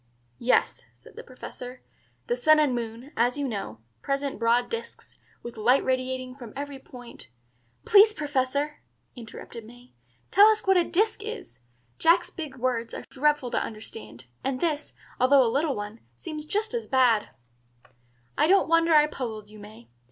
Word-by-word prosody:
"Yes," 250 - +1
said - - -19
the - - -8
Professor. 250 0 -10 0.4
"The 240 - 0
sun 310 +5 +5
and 295 -4 +3
moon, 235 +3 -5
as 245 +3 +1
you 285 -1 -1
know, 155 - -5 0.2
present 275 -3 -2
broad 235 +1 +2
disks, 460 0 -7 0.2
with 235 -1 -8
light 245 +5 +3
radiating 255 0 -2
from 240 -5 -11
every 285 0 -6
point 245 - -12 0.3
" 120 0 -40
"Please, 420 +1 +7
Professor," 290 -3 -2 0.3
interrupted 230 -1 -10
May, 245 +3 -16 0.4
"tell 405 +2 +8
us 435 0 +2
what 385 0 +4
a 355 - +5
'disk' 420 +5 0
is. 415 - -8 0.4
Jack's 340 +2 +3
big 310 -6 -7
words 245 -2 -2
are - - -7
dreadful 290 -2 +1
to - - 0
understand; 120 - -9 0.2
and 265 -1 -2
this, 300 -2 -2 0.2
although 260 +1 +5
a 230 - 0
little 285 +1 +1
one, 210 +2 -6 0.2
seems 305 - -7
just 430 +7 -2
as 470 -1 -3
bad." 250 -5 +3 1.1
"I - - +3
don't 390 +3 +4
wonder 330 0 +4
I 300 0 +7
puzzled 220 -8 -6
you, 215 - -13
May. 205 - -13
260 Hz, 165 wpm, -26 LUFS, 230-300 Hz, 1.1 s, tell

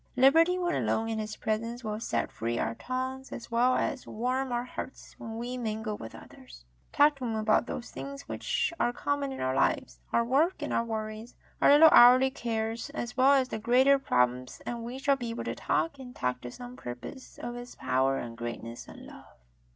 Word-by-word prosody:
Liberty 325 +8 +5
when 350 -1 0
alone 225 0 0
in 220 -1 -2
His 215 0 -4
presence 230 +3 -3
will 215 -1 -3
set 230 - -2
free 115 +1 -3
our 115 - -1
tongues 260 - -4
as 235 - -8
well 245 +2 +3
as 275 -3 -2
warm 255 +4 -2
our 240 0 0
hearts 250 +1 -8
when 225 0 -6
we 245 +2 -4
mingle 220 -2 -3
with 115 - -9
others. - - -14 0.3
Talk 290 0 +4
to 265 - -8
Him 230 -2 -2
about 215 +2 +2
those 245 - -6
things 275 0 -7
which 480 -7 -1
are 240 - +1
common 285 +1 -2
in 265 - -6
our 130 0 0
lives - - 0
— - - -35
our 235 - +2
work, 295 +9 +2
our - - 0
worries, 220 0 -5 0.3
our - - +6
little 300 +3 +9
hourly 255 +2 +8
cares 225 0 -3
as 240 -5 -4
well 270 +2 +5
as 265 -2 +3
the 220 - -4
greater 260 +5 +4
problems, 125 - 0
and 235 -1 -4
we 240 +3 -6
shall 275 +1 +2
be 240 -3 -4
able 230 - -4
to - - -3
talk, 305 -4 -1
and 250 -1 -10
talk 125 0 -2
to 125 - -6
some 245 - -9
purpose, 125 - -9
of 240 - -5
His 245 0 -9
power 135 +1 +1
and 115 -2 -6
greatness 115 0 -6
and - - -12
love." - - -14
240 Hz, 205 wpm, -29 LUFS, 215-265 Hz, 0.3 s, little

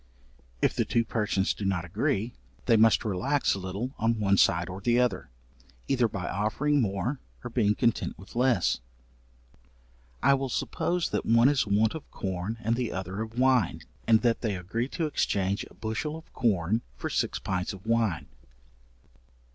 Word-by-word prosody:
If - - +3
the - - +2
two 115 0 +1
persons 105 -4 0
do - - -7
not 95 -3 0
agree, 100 +6 -1 0.3
they 115 - +5
must 110 0 +4
relax 130 +9 +1
a 100 - -3
little 100 +8 -4
on 115 0 +1
one 100 -2 +3
side 85 -2 +3
or 95 +1 -7
the 120 +3 +3
other, 100 - 0 0.6
either 125 -3 +3
by 100 -4 -5
offering 135 +9 +1
more 115 +6 -1 0.2
or 125 - -6
being 105 -3 +2
content 115 - 0
with 95 - -14
less. 120 -6 +2 1.4
I 140 - +6
will 135 -1 -1
suppose 175 +7 -1
that - - 0
one 115 +3 +5
is 145 -6 +1
want 105 +2 +2
of 160 - -8
corn 95 +3 -4
and 115 +1 +1
the 120 -2 -2
other 95 +2 -4
of 110 +1 -6
wine; 130 -6 +3 0.3
and 110 -1 +5
that 115 -2 +2
they 110 -4 -1
agree 95 +7 -3
to 165 +3 -2
exchange 100 -9 0
a - - -19
bushel 120 +8 -3
of 160 - -15
corn 105 -1 +1 0.2
for - - -3
six - - 0
pints 95 0 -2
of 95 -1 -11
wine. 115 -7 +1
110 Hz, 170 wpm, -28 LUFS, 95-125 Hz, 1.4 s, I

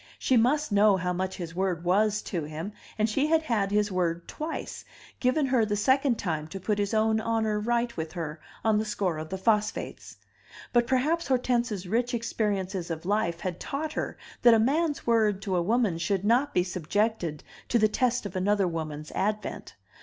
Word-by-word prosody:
She 260 - +1
must 265 +4 +2
know 205 -1 +5
how 180 0 -1
much 190 +1 -2
his 170 -2 -6
word 180 -2 -1
was 210 +4 +2
to 170 -5 -3
him, 160 +7 -6 0.2
and 215 0 +2
she 275 +7 +1
had 320 0 +3
had 220 -9 0
his 210 0 +1
word 170 -2 -1
twice, 315 +2 -5 0.4
given 265 +4 +2
her 255 -3 +3
the 210 -1 0
second 260 +3 +2
time 155 -4 -2
to 195 +5 -7
put 205 +3 -1
his 205 +2 0
own 220 0 +3
honor 220 -2 0
right 235 +2 0
with 160 -1 -4
her 160 -3 -5 0.2
on 215 -1 +4
the - - 0
score 190 -6 -1
of 155 0 -6
the 190 - -3
phosphates. 210 +1 -1 0.6
But 240 -1 +3
perhaps 300 +6 +1
Hortense's 240 -7 0
rich 240 +5 0
experiences 200 -6 -2
of 165 0 -5
life 190 -4 0
had 180 -2 -3
taught 305 +2 -4
her - - -3 0.2
that 240 -1 +7
a - - +4
man's 295 +6 +1
word 220 -4 +3
to 190 -3 -1
a 175 - +2
woman 210 -2 +1
should 190 +3 -1
not 250 +6 +3
be 180 - +2
subjected 180 -2 -1 0.3
to 240 - +3
the 215 -1 +4
test 250 +2 0
of 195 - -6
another 195 +1 +2
woman's 155 -2 -5
advent. 210 +1 -3
210 Hz, 190 wpm, -27 LUFS, 180-235 Hz, 0.6 s, that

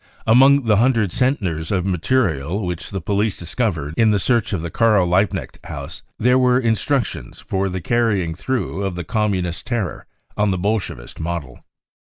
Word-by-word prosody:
Among 135 +4 +5
the 105 -2 +4
hundred 115 -4 +2
centners 95 - -1
of 95 -3 0
material 95 - 0
which 90 -1 -4
the 95 -2 -4
police 100 +2 0
discovered 85 - -2
in 115 -1 +4
the 105 - +3
search 115 +2 +1
of 90 -6 -2
the 85 - -5
Karl 110 -3 +3
Liebknecht 90 +2 0
house, - - -7 0.2
there 125 +3 +3
were 125 -1 +4
instructions 120 +2 -1
for 95 0 -2
the 95 0 -4
carrying 105 -6 +1
through 110 +1 -3
of 95 -2 -2
the 90 - -4
Communist 95 -4 -1
terror 115 -6 -3 0.3
on 105 0 +1
the 95 - 0
Bolshevist 95 - -3
model. 80 -6 -5
100 Hz, 160 wpm, -20 LUFS, 90-115 Hz, 0.3 s, Among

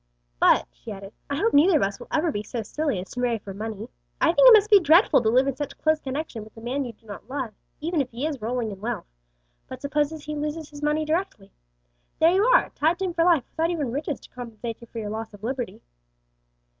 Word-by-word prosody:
"But," - - +5
she - - -11
added, 195 +1 -9 0.2
"I 280 - -1
hope 430 +9 +1
neither 325 +5 +6
of - - +1
us 195 +2 -2
will 240 - -10
ever 320 +1 +1
be 205 - -3
so 225 +2 -5
silly 290 +1 -2
as 180 - -8
to 250 - -6
marry 245 -2 +1
for 200 -2 -9
money. 215 +1 -6 0.3
I 330 - +3
think - - +7
it - - +10
must 425 0 +5
be 410 - +9
dreadful 335 - +5
to 220 - +2
live 255 +4 +4
in 275 -2 -1
such 290 0 -5
close 315 0 +2
connection 270 -5 -5
with 215 +1 -16
a - - -8
man 260 +4 -2
you 240 - -7
do 225 - -31
not 210 +2 -10
love, 260 -5 -4 0.3
even 325 0 0
if 260 - -4
he 245 +5 -4
is 295 -6 -3
rolling 230 0 -2
in 195 -1 -10
wealth; 225 -4 -3 0.6
but - - -8
suppose 295 +1 0
he 300 0 -5
loses 300 +1 -4
his 290 0 -10
money 300 +1 +1
directly? 310 - -2 0.7
There 325 +1 +5
you 385 +3 +3
are, - - +4
tied 320 +4 +1
to 385 - -2
him 360 - -2
for 335 -1 +2
life 335 -6 +4
without 330 +1 0
even 300 -8 -2
riches 290 +2 -3
to - - -15
compensate 235 -2 -7
you 235 - -12
for 230 - -11
your 210 -2 -4
loss 220 -1 -6
of 205 - -18
liberty." 250 +1 -4
275 Hz, 250 wpm, -25 LUFS, 225-315 Hz, 0.7 s, it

